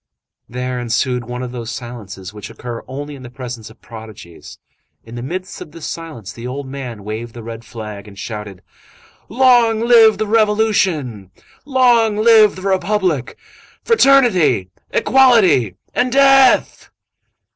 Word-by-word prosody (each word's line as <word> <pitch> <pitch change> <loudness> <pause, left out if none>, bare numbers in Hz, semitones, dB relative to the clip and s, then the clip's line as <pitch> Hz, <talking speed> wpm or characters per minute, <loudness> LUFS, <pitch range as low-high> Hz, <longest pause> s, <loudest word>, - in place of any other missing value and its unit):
There 125 +1 -4
ensued 120 +1 -1
one 125 +1 -6
of 125 - -6
those 120 -2 -7
silences 105 -6 -8
which 105 -1 -9
occur 120 0 -8
only 145 +3 -7
in 140 - -11
the 125 - -10
presence 125 -3 -8
of 110 - -19
prodigies. 110 -6 -12 0.5
In 115 - -13
the 120 - -6
midst 185 +8 -6
of - - -10
this 165 - -9
silence, 155 - -7
the 120 +1 -8
old 135 +2 -5
man 125 -6 -7
waved 110 +3 -6
the 120 - -9
red 115 0 -8
flag 105 -3 -9
and 100 -1 -14
shouted:— 105 -3 -8 0.7
"Long 240 -2 +3
live 230 -3 +5
the 215 - -1
Revolution! 205 - 0 0.4
Long 240 -6 +3
live 215 -1 +5
the 185 - -10
Republic! 190 - -1 0.5
Fraternity! 245 - +3 0.2
Equality! 225 - +3 0.2
and 250 0 0
Death!" 270 0 +4
130 Hz, 140 wpm, -17 LUFS, -, 0.7 s, live